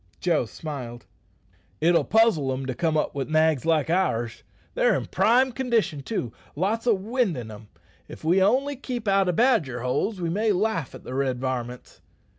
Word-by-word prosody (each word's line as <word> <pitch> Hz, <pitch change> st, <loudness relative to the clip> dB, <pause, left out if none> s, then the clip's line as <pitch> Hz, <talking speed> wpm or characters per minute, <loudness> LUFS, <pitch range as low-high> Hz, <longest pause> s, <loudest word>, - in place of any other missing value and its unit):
Joe 170 Hz, -8 st, +1 dB
smiled. 125 Hz, -5 st, -7 dB, 0.7 s
"It'll 170 Hz, +2 st, +3 dB
puzzle 220 Hz, -11 st, +3 dB
them 130 Hz, 0 st, -3 dB
to 130 Hz, -, -3 dB
come 155 Hz, +5 st, 0 dB
up -, -, -1 dB
wi' 140 Hz, -2 st, -2 dB
nags 155 Hz, -1 st, +2 dB
like 160 Hz, -4 st, +2 dB
ours. 120 Hz, -11 st, 0 dB, 0.3 s
They're -, -, +3 dB
in -, -, -2 dB
prime 255 Hz, +3 st, +3 dB
condition, 230 Hz, -, 0 dB
too 130 Hz, -, -4 dB, 0.2 s
lots 215 Hz, +9 st, -1 dB
o' 235 Hz, -, +6 dB
wind 210 Hz, -, -1 dB
in' 115 Hz, -3 st, -7 dB
em. 105 Hz, 0 st, -12 dB, 0.4 s
If -, -, -11 dB
we 175 Hz, +4 st, +3 dB
only 265 Hz, +8 st, +2 dB
keep 245 Hz, -4 st, -6 dB
out 195 Hz, -1 st, +3 dB
o' -, -, +4 dB
badger 175 Hz, -, +2 dB
holes 155 Hz, -, -1 dB
we 170 Hz, -2 st, -2 dB
may 210 Hz, +3 st, +1 dB
laugh 185 Hz, -, -1 dB
at -, -, -12 dB
the 125 Hz, -, -7 dB
red 130 Hz, -2 st, -1 dB
varmints." 125 Hz, -1 st, -5 dB
165 Hz, 180 wpm, -25 LUFS, 130-220 Hz, 0.7 s, o